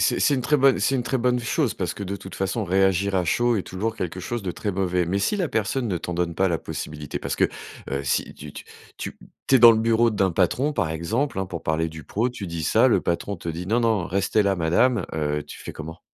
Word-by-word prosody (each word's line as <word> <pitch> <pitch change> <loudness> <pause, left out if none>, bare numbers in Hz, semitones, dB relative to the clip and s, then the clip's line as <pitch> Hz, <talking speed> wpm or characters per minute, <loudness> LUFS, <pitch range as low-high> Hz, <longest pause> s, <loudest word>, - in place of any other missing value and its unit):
c'est - - +2
c'est 145 - +4
une 130 - -1
très 150 +4 +2
bonne 135 0 +5
c'est 135 - +2
une 125 - -1
très 130 +2 -1
bonne 125 0 +1
chose 125 +1 0
parce 90 -3 -3
que, - - -7
de 100 0 -3
toute 95 0 -9
façon, 95 +4 -1
réagir 95 +1 +2
à 90 -2 +2
chaud 120 +7 +2
est 95 - -1
toujours 110 +6 -3
quelque 90 0 -4
chose 120 +4 -4
de 95 - -2
très 105 +4 -3
mauvais. 90 -2 0
Mais 95 +3 0
si 210 - 0
la 180 -5 0
personne 120 +1 -1
ne 90 - 0
t'en 90 - -5
donne 85 -1 -1
pas 95 +3 +2
la 85 -2 0
possibilité, 75 -2 -6
parce - - -3
que, - - +3 0.5
heu, 70 +1 -2
si 65 - -1
tu 70 0 -10
tu - - -9 0.3
tu - - -6 0.3
tu - - +3
es - - +8
dans 120 -1 +9
le 110 - +1
bureau 115 +1 +3
d'un 100 -3 +1
patron, 125 - +1
par 80 - 0
exemple, 100 - -1
hein, 95 - -1
pour 85 -2 -6
parler 80 +1 0
du 80 -1 -10
pro, 115 +5 0
tu 120 -5 -7
dis 85 -1 -4
ça, - - +4
le - - +3
patron 90 +4 -2
te 85 - -7
dit: 85 +2 -4
«Non 115 +5 +2
non, 110 -5 +2
restez 100 +3 +1
là, 100 -1 +2
Madame», 90 +9 +2
heu, 75 -1 -1
tu - - -10
fais - - -8
comment? 80 +1 -8
95 Hz, 270 wpm, -24 LUFS, 85-115 Hz, 0.5 s, dans